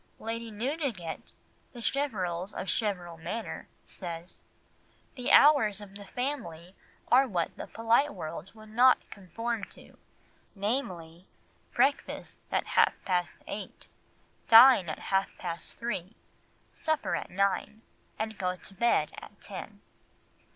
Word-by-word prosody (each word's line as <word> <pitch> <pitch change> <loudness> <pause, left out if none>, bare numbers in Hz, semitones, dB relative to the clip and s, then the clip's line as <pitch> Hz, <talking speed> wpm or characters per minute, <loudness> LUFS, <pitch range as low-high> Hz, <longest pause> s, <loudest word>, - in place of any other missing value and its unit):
Lady 230 +1 -4
Newdigate 225 - -3 0.4
(The 240 - -9
Cheverels 200 -9 -1
of - - -3
Cheverel 180 -6 -2
Manor) 220 +8 -5 0.2
says, 170 -1 -7 0.7
"The 250 -2 -2
hours 255 -9 +6
of 205 -2 -11
the 200 0 -10
family 190 - -4 0.4
are 265 +2 +6
what 175 -7 -1
the - - -7
polite 230 +6 +2
world 165 - -6
would 215 0 -13
not 250 +4 +5
conform 230 +3 -4
to, - - -15 0.6
viz., 185 -6 -3 0.5
breakfast 280 +1 0
at - - +1
half - - +5
past 180 -2 -1
eight, 200 -1 -7 0.6
dine 225 -6 +9
at 155 - -3 0.2
half 195 0 +3
past 170 -2 -6
three, 225 -4 -4 0.6
supper 315 -2 0
at - - -4
nine, 200 +3 0 0.3
and 220 -1 -4
go 180 -1 0
to 190 - -13
bed 195 -8 +2
at - - -13
ten." - - -9
210 Hz, 125 wpm, -30 LUFS, 180-240 Hz, 0.7 s, dine